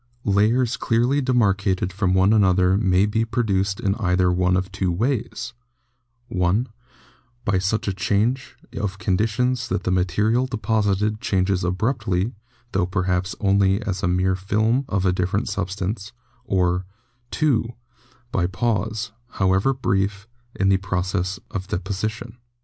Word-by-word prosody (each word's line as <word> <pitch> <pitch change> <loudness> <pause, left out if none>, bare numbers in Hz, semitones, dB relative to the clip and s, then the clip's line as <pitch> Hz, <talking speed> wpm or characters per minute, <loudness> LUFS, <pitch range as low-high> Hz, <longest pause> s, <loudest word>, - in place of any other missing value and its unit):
Layers 110 +5 +2
clearly 125 +5 +1
demar 125 -6 +3
cated 95 -2 -1
from 95 -1 +1
one 95 +3 +4
another 95 -3 +4
may 95 -2 +3
be 110 +2 0
produced 100 -5 0
in 100 - +1
either 90 -3 +2
one 90 +1 +2
of 95 +1 -3
two 95 -1 -1
ways: 115 +7 -2 0.8
(i) 90 +5 +2 0.8
By 95 -1 +2
such 100 +4 -1
a 100 - 0
change 115 +7 0 0.2
of 95 -2 -3
conditions 115 +5 0
that 95 - -2
the 90 - 0
material 105 +7 +1
deposited 105 -3 0
changes 95 -1 +1
abruptly, 100 +2 0 0.4
tho 90 -2 +1
perhaps 90 0 -1
only 100 -1 +3
as 95 -2 -3
a 95 - +1
mere 90 +1 +2
film 110 +7 +1
of 100 -1 0
a 90 - +3
different 90 0 -1
substance; 100 +3 -3 0.3
or 90 -1 +1 0.4
(2) 130 -7 +1 0.6
by 90 - +1
a - - +1
pause, 110 +3 -1 0.2
however 95 +6 +2
brief, 100 -5 -1 0.3
in 95 0 +2
the 95 - +4
process 95 0 -2
of 95 -1 -4
deposition. 110 +5 -4
100 Hz, 140 wpm, -23 LUFS, 95-110 Hz, 0.8 s, one